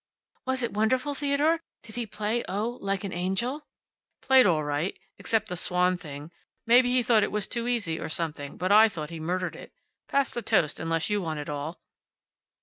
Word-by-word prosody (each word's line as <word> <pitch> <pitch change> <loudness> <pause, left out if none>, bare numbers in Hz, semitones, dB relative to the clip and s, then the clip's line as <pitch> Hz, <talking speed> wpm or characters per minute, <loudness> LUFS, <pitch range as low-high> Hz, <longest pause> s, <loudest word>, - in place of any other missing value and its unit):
"Was 260 -1 +1
it 235 - -2
wonderful, 255 +7 +1
Theodore? 290 +3 +2 0.2
Did 220 - -13
he 240 -1 -3
play 215 +3 -2
oh 220 +6 -2
like 195 0 -1
an 195 - -4
angel?" 215 - -2 0.6
"Played 265 -3 +6
all 160 -4 +2
right. 145 +5 -2 0.2
Except 220 -1 0
the 180 - -5
`Swan' 180 +1 +1
thing. 150 -2 -9 0.3
Maybe 245 +2 +6
he 250 0 +3
thought 230 -2 +4
it - - 0
was 210 -1 -1
too 235 -1 -3
easy, 210 -10 -1
or - - -4
something, 155 -3 -3
but 185 +3 -1
I 220 +2 +8
thought 160 -5 -6
he 165 - -6
murdered 180 +3 -2
it. - - -11 0.4
Pass 280 -1 +1
the 240 - -3
toast, 195 -9 +1
unless 165 +3 -1
you 205 -1 +1
want 160 -3 -3
it 145 - -6
all." 150 +3 -5
205 Hz, 195 wpm, -27 LUFS, 165-240 Hz, 0.6 s, I